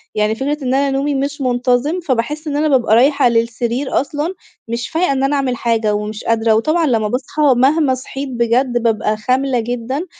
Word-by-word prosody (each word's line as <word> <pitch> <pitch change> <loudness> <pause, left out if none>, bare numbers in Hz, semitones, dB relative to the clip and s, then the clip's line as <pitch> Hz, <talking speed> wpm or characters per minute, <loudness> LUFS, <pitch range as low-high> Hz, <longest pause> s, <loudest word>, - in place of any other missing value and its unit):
يعني 215 +1 +1
فكرة 280 +5 -2
إن 255 0 0
أنا 275 +1 +1
نومي 280 +1 -1
مش 280 +2 -3
منتظم، 250 +5 0
فباحس 300 0 -2
إن 290 - -2
أنا 310 +1 +1
بابقى 255 -6 +3
رايحة 275 +2 +4
للسرير 235 +3 0
أصلًا 295 +5 -4 0.3
مش 235 +1 -4
فايقة 330 0 0
إن 270 -1 0
أنا 275 +2 +1
أعمل 270 -3 0
حاجة 230 -3 0
ومش 210 +1 -5
قادرة 225 -1 +2
وطبعًا 310 +10 +1
لما 225 -5 +1
باصحى، 255 +6 -3 0.2
مهما 275 +2 +3
صحيت 270 +2 -6
بجد 240 0 0
بابقى 215 -2 0
خاملة 255 +3 0
جدًا، 245 +6 -3
255 Hz, 180 wpm, -17 LUFS, 230-280 Hz, 0.3 s, رايحة